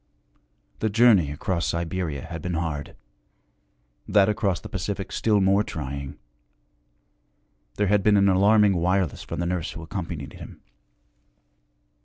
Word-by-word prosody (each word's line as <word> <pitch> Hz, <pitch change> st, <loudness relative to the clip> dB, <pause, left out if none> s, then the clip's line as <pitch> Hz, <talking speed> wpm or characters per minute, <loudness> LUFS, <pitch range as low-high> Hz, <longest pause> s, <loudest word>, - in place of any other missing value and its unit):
The 110 Hz, -, 0 dB
journey 105 Hz, -7 st, +5 dB
across 85 Hz, +4 st, -2 dB
Siberia 85 Hz, -4 st, -3 dB
had 80 Hz, -2 st, -7 dB
been 90 Hz, +1 st, -3 dB
hard, 80 Hz, -3 st, -4 dB, 1.1 s
that 100 Hz, -1 st, +4 dB
across 100 Hz, -4 st, 0 dB
the -, -, -9 dB
Pacific 100 Hz, +1 st, -4 dB
still 105 Hz, -2 st, +2 dB
more 100 Hz, +2 st, +3 dB
trying; 70 Hz, -6 st, -6 dB, 1.6 s
there 105 Hz, -, +1 dB
had 105 Hz, +1 st, +3 dB
been 105 Hz, +1 st, +4 dB
an 100 Hz, 0 st, +4 dB
alarming 100 Hz, +1 st, +4 dB
wireless 90 Hz, -1 st, 0 dB
from -, -, -6 dB
the 85 Hz, -, -1 dB
nurse 85 Hz, -2 st, -2 dB
who 80 Hz, 0 st, -8 dB
accompanied 80 Hz, -4 st, -6 dB
him. -, -, -11 dB
95 Hz, 130 wpm, -25 LUFS, 80-100 Hz, 1.6 s, journey